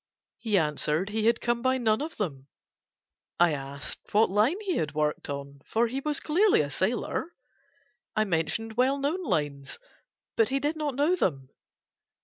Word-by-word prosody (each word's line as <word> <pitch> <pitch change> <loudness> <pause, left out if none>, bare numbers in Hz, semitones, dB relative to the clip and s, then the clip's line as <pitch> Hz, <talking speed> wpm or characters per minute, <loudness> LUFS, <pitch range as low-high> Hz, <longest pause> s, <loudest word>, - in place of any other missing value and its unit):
He 215 -4 +1
answered 155 +3 +1
he 220 +1 0
had 235 - +3
come 240 0 0
by 260 +1 +2
none 220 -1 +1
of 315 +2 -5
them. 140 -10 -4 0.9
I 175 -2 +5
asked 140 0 -6
him - - -21
what 220 - +4
line 220 - +2
he 385 -5 0
worked 150 -1 -2
on, 140 0 -6
for 230 +2 +2
he 250 +4 -2
was 295 +1 -1
clearly 370 - +3
a 145 -1 -3
sailor; 240 - -1 0.8
I 215 - +3
mentioned 215 +5 -2
well 260 +3 +3
known 290 +7 -1
lines, 145 - -2 0.6
but 225 0 +3
he 270 +1 +1
did 295 +3 -1
not 300 -4 -2
know 295 +6 +3
them. 135 - -1
220 Hz, 165 wpm, -28 LUFS, -, 0.9 s, I